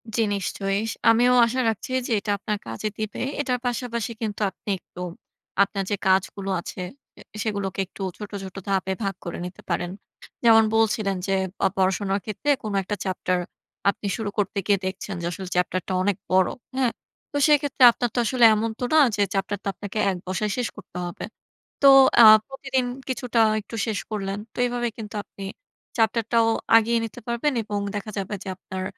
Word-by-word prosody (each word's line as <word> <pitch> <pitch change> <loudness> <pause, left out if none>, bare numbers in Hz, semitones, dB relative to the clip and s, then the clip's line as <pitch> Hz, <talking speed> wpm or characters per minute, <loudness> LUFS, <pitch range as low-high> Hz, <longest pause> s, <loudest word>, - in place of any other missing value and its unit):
জ্বি, 230 - +3
নিশ্চয়ই। 195 +1 -1 0.3
আমিও 240 +2 +5
আশা 240 +3 -2
রাখছি 220 +3 -4 0.2
যে - - -5
এটা 205 +1 -3
আপনার 210 +1 -2
কাজে 115 - -3
দিবে। 215 -1 -4 0.2
এটার 250 -3 -1
পাশাপাশি 235 -2 -2
কিন্তু 215 -1 -3
আপনি - - -11
একটু 175 - -12 0.6
আপনার 200 0 -2
যে - - +3
কাজগুলো 195 +1 +1
আছে 180 +1 -7 0.3
অ্যা - - -14 0.2
সেগুলোকে 200 -3 -3
একটু 190 - -13 0.2
ছোট, 210 0 -8
ছোট 190 0 -9
ধাপে 190 -1 0
ভাগ 195 -1 -1
করে 170 - -4
নিতে 180 0 -9
পারেন। 175 0 -1 0.5
যেমন 225 -1 +7
বলছিলেন 215 -3 +2
যে, 195 - +1 0.3
অ - - +7
পড়াশোনার 195 +1 +1
ক্ষেত্রে 220 +7 -3
কোন 215 -2 -3
একটা 205 +3 -3
চ্যাপ্টার 185 -1 -1 0.5
আপনি 200 - -3
শুরু 220 -3 -3
করতে 205 0 -1
গিয়ে 200 -2 +3
দেখছেন 190 +1 -4
যে - - -3
আসলে 190 +2 -6
চ্যাপ্টারটা 185 +1 0
অনেক 195 0 +1
বড়। 185 -1 +5 0.3
হ্যাঁ? 255 -3 +2 0.4
তো 290 - -2
সেক্ষেত্রে 285 -3 +3
আপনার 240 +1 -2
তো - - +2
আসলে 240 +1 +4
এমন 220 +2 0 0.2
না 315 - +7 0.2
যে 205 - 0
চ্যাপ্টারটা 200 +1 -2
আপনাকে 205 +3 -7
১ 190 - -1
বসায় 205 +3 -1
শেষ 245 -2 0
করতে - - -11
হবে। 175 - -6 0.6
তো 275 - +10 0.3
আ - - +11 0.2
প্রতিদিন 270 -1 -2 0.2
কিছুটা 245 -2 +1 0.2
একটু 220 - -9
শেষ 215 -2 -1
করলেন। 195 -2 -2 0.2
তো - - -19
এভাবেই 240 -1 -2
কিন্তু 215 0 -7
আপনি 195 - -10 0.5
চ্যাপ্টারটাও 230 0 +2 0.3
আগিয়ে 230 +1 +2
নিতে 225 - -9
পারবেন 235 +5 0
এবং 205 -1 -3 0.2
দেখা 205 +1 -4
যাবে 195 +1 -3
যে 195 - -6
আপনার 190 0 -6
210 Hz, 175 wpm, -24 LUFS, 195-230 Hz, 0.6 s, আ